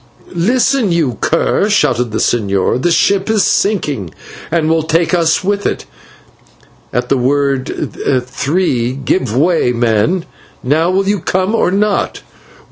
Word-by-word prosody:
"Listen, 235 +4 +1
you 150 -10 0
cur," 180 +5 +1
shouted 125 - +1
the 110 - -2
señor, 100 +1 0
"the 175 - +1
ship 195 +4 +2
is 220 -2 +2
sinking 150 - 0 0.4
and 165 -1 0
will 160 0 +2
take 165 +2 0
us 165 -1 +2
with 200 +1 -1
it. - - -4 1.1
At 125 - -2
the 135 - +2
word 135 0 -1 0.3
'three,' 135 -2 -1
give 130 -3 -1
way, 160 -4 +2
men. 120 - 0 0.4
Now 155 +6 +1
will 195 +1 0
you 205 0 +1
come, 185 +5 -1
or 225 - +2
not? 200 +2 -1
165 Hz, 135 wpm, -14 LUFS, 125-190 Hz, 1.1 s, ship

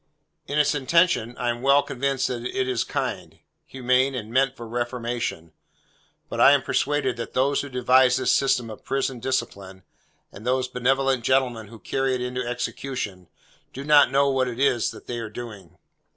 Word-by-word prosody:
In 145 - -2
its 150 - +3
intention, 140 -4 +2
I 120 -1 0
am 120 0 -6
well 140 +2 +4
convinced 135 0 -1
that 120 -2 -4
it 130 +1 -2
is 125 -3 0
kind, - - -4 0.3
humane, 130 +1 +1
and 110 -3 -6
meant 135 0 +2
for 115 - -8
reformation; 120 -7 -3 0.8
but - - -3
I - - +8
am - - +2
persuaded 135 -4 0
that 115 - -6
those 135 +2 +1
who 140 - -7
devised 125 0 +4
this 130 - +1
system 125 -4 +1
of 110 - -11
Prison 135 -2 -2
Discipline, 100 -7 -4 0.5
and 100 - -12
those 130 +1 0
benevolent 130 0 +1
gentlemen 125 -4 +1
who 115 - -12
carry 135 +3 -1
it 125 - -4
into 125 0 -3
execution, 120 -5 -4 0.5
do 135 - -6
not 145 -1 +6
know 140 +1 +3
what 130 -1 +1
it 125 0 -5
is 135 -4 +2
that - - -11
they 120 -1 -4
are 110 -2 -5
doing. 105 -6 -10
125 Hz, 180 wpm, -24 LUFS, 120-135 Hz, 0.8 s, I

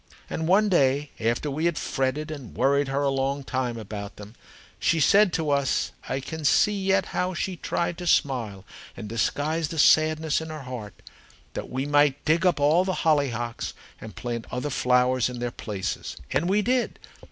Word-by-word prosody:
And 160 - -2
one 205 +4 +4
day, 145 -5 +2
after 120 +6 0
we 155 +4 -2
had 170 -3 +1
fretted 140 +4 -2
and 140 -7 -8
worried 140 +1 +2
her 135 +1 -1
a 140 - +2
long 135 +1 -1
time 130 -3 -2
about 105 -2 -7
them, 105 +1 -11 0.5
she 165 +1 +2
said 195 +7 +5
to 155 -2 0
us 140 -1 +1 0.2
I 135 - -1
can 160 +4 -7
see 210 +8 +4
yet 195 -1 +1
how 180 0 -1
she 185 +1 -2
tried 170 0 -2
to 175 - -5
smile 115 - +1 0.3
and - - -6
disguise 145 +8 -1
the 165 - -7
sadness 155 0 +4
in 160 - -7
her 155 -3 -7
heart 120 -6 -8 0.5
that - - -5
we 130 +2 -2
might 145 -1 +2
dig 165 +4 +3
up 175 - +2
all 155 +5 +4
the 185 -1 -2
hollyhocks 120 -7 0 0.2
and 110 -4 -10
plant 120 0 -4
other 125 +4 -3
flowers 125 0 +2
in 125 - -6
their 120 0 -3
places. 105 -5 -5
And 165 +6 +1
we 205 +2 +2
did. 250 +2 0
145 Hz, 185 wpm, -25 LUFS, 125-160 Hz, 0.5 s, said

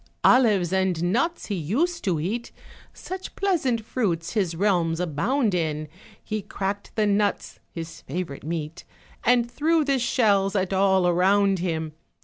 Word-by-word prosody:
Olives 205 -9 +4
and 190 -3 +1
nuts 335 +8 0
he 210 - -4
used 260 - -1
to 175 -5 +1
eat, 220 +9 -3 0.4
Such 375 0 -8
pleasant 275 - 0
fruits 180 -10 -2
his 190 -7 0
realms 170 -3 +1
abound 200 - 0
in, 155 -3 -1 0.4
He 215 -1 -3
cracked 200 +1 -4
the 215 - +2
nuts 205 -1 0
(his 165 -1 -8
favorite 170 -6 -5
meat), 160 +1 -5 0.4
And 240 -1 +3
threw 310 +4 +2
the 275 -2 +1
shells 205 -5 +2
at 190 -1 0
all 190 -1 +3
around 190 +2 +3
him. 160 -3 -2
195 Hz, 140 wpm, -25 LUFS, 175-235 Hz, 0.4 s, Olives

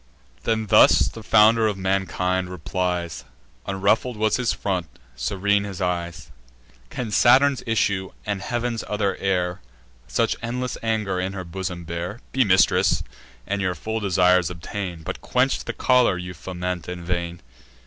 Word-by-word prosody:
Then 110 -1 +1
thus 105 +1 +6
the 115 - -10
founder 110 +1 +5
of 105 -2 -2
mankind 95 -1 0
replies 90 -2 -3 0.4
(Unruffled 105 +5 +1
was 110 0 +2
his 125 -2 +1
front, 90 -5 -2 0.3
serene 100 +8 +1
his 100 -3 -6
eyes) 90 -3 -3 0.6
"Can 115 -4 -5
Saturn's 130 +5 +5
issue, 100 -4 +1 0.2
and 100 -2 -2
heav'n's 120 +5 -2
other 105 -2 0
heir, 90 -2 -1 0.5
Such - - +1
endless 125 +1 -3
anger 110 -5 -1
in 95 +1 -2
her 95 -2 -5
bosom 90 0 -5
bear? 85 +6 -5
Be 130 - +3
mistress, 95 -4 +3 0.4
and 100 0 -2
your 90 -2 0
full 110 +7 -3
desires 90 -3 +3
obtain; 90 0 -6
But - - -5
quench 125 +2 +1
the - - -2
choler 125 -7 +3
you 90 0 -6
foment 90 +1 -5
in 90 -1 -6
vain. 85 -1 -3
95 Hz, 145 wpm, -23 LUFS, 90-110 Hz, 0.6 s, thus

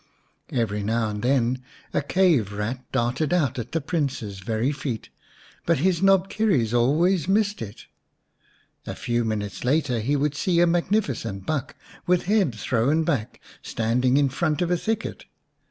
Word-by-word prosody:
Every 110 -4 -1
now 110 +2 0
and 105 0 -4
then 125 0 +1 0.3
a - - +2
cave 145 - +2
rat 115 +5 -4
darted 125 +4 0
out 150 -9 +1
at 120 +1 -6
the 165 - 0
Prince's 135 - -3
very 115 +6 -1
feet, 140 -6 -5 0.6
but 170 -1 +3
his 175 +4 +1
knobkerrie 195 - +2
always 155 +8 +2
missed 205 +1 +1
it; 105 0 -8 1.0
a - - -4
few 120 0 -1
minutes 105 -3 -3
later 130 -2 +1
he 135 +7 0
would 145 0 +1
see 170 +4 +1
a 175 - +6
magnificent 170 - 0
buck, 150 -5 -2 0.3
with 180 0 +3
head 195 - +2
thrown 130 +8 +1
back, 125 -8 -2 0.2
standing 125 +4 +1
in 140 -1 +3
front 155 +4 0
of 175 - -1
a - - +4
thicket. 220 +5 -3
135 Hz, 155 wpm, -24 LUFS, 115-170 Hz, 1.0 s, a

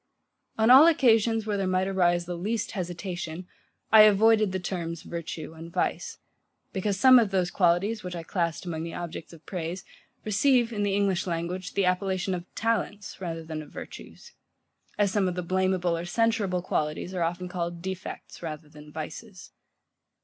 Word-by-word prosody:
On 220 +2 +4
all 275 +5 +10
occasions, 225 -7 +3
where 210 -2 -1
there 195 -1 -1
might 185 0 +1
arise 175 -2 +2
the 175 0 -4
least 210 +5 -2
hesitation, 175 -2 -5 0.4
I 220 - +9
avoided 215 0 +5
the 190 - -2
terms 170 -3 -4
VIRTUE 165 -2 -6
and 165 +1 -10
VICE; - - -2 0.6
because 195 0 -1
some 255 +2 +8
of 225 -4 +1
those 185 -2 0
qualities, 195 +5 +1
which 180 -1 -5
I 170 - -5
classed 170 0 -2
among 165 -2 -4
the 165 0 -5
objects 170 -2 -6
of 165 -2 -15
praise, 175 0 -5 0.4
receive, 235 +3 +2
in 205 - -2
the 200 -1 +1
English 195 -2 +1
language, 175 +2 -4
the 200 - +2
appellation 185 +1 0
of 175 -1 -4
TALENTS, 210 -3 -2
rather 165 -2 -4
than 160 -1 -5
of 150 - -12
virtues; - - -11 0.6
as 205 -2 +2
some 200 -2 +1
of 180 - -2
the 180 - -3
blameable 185 -1 +1
or 165 +1 -4
censurable 205 -3 0
qualities 155 +2 -2
are 180 - -2
often 175 +2 -2
called 175 -1 -4
defects, 190 0 -7
rather 155 -2 -7
than 150 0 -14
vices. 180 +6 -8
185 Hz, 170 wpm, -27 LUFS, 170-205 Hz, 0.6 s, all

